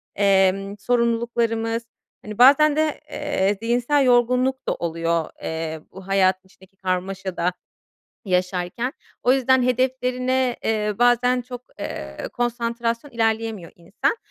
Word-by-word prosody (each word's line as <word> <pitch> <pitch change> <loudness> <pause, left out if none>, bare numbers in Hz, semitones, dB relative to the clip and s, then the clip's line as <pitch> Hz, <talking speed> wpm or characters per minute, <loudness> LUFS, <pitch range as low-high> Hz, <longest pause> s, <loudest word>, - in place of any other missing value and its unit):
emm, 195 0 +2
sorumluluklarımız, 230 0 0 0.4
hani, 210 -1 -8
bazen 285 +4 +6
de, 310 -1 0
eee, 205 -9 0
zihinsel 245 +5 +2
yorgunluk 250 +2 +2
da - - +2
oluyor, 165 -1 -1
eee, 160 -1 -4
bu 190 0 -12
hayat, 190 -1 +3
içindeki 190 0 -22
karmaşada 185 -1 -2 0.7
yaşarken. 180 +5 -1 0.3
O 250 - +4
yüzden 260 -1 +3
hedeflerine, 255 0 0
eee, 210 -1 0
bazen 245 +1 +3
çok, 245 0 -9 0.2
eee, 70 0 -6 0.2
konsantrasyon 235 +1 -2
ilerleyemiyor 225 -5 -1
insan. 175 - -1
230 Hz, 110 wpm, -22 LUFS, 190-250 Hz, 0.7 s, bazen